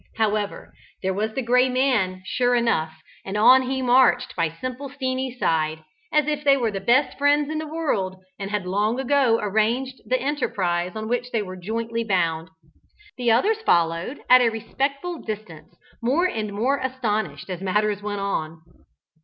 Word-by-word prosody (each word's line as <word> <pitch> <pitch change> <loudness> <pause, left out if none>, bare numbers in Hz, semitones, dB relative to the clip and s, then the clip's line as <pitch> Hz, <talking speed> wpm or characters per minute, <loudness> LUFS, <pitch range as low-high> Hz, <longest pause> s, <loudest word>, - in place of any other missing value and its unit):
However, 215 -2 -1 0.3
there 190 0 0
was 215 +3 -2
the 265 - -1
Gray 250 +2 +3
Man, 235 -8 +1
sure 245 +4 +1
enough, 230 -10 +1 0.3
and 195 +2 -4
on 255 +5 +7
he 260 0 -2
marched 250 0 +3
by 170 -2 +1
"Simple 255 - -6
Steenie's" 260 -2 -3
side, 160 -6 0 0.3
as 300 -1 +3
if 300 -1 -2
they 280 -1 +5
were 235 -4 0
the 195 - -3
best 255 +9 +2
friends 290 +1 +3
in 310 - -2
the 315 - -5
world, 210 -13 -1 0.2
and 195 0 -4
had 205 -2 -2
long 210 +6 0
ago 265 -3 +3
arranged 230 +6 0
the 255 0 +1
enterprise 185 -11 -1
on 220 0 -4
which 245 +1 -1
they 225 -3 -1
were 185 -1 -8
jointly 230 +5 -3
bound. 170 -5 0 0.7
The 245 -2 0
others 405 - +3
followed 170 - +1
at 255 0 +8
a 240 - +4
respectful 275 +9 -3
distance, 185 -7 -7 0.3
more 275 +10 +2
and 215 - -2
more 250 +7 0
astonished 215 - -2
as 180 0 -5
matters 205 +2 0
went 205 -1 -4
on. 160 -5 -3
230 Hz, 170 wpm, -23 LUFS, 195-260 Hz, 0.7 s, at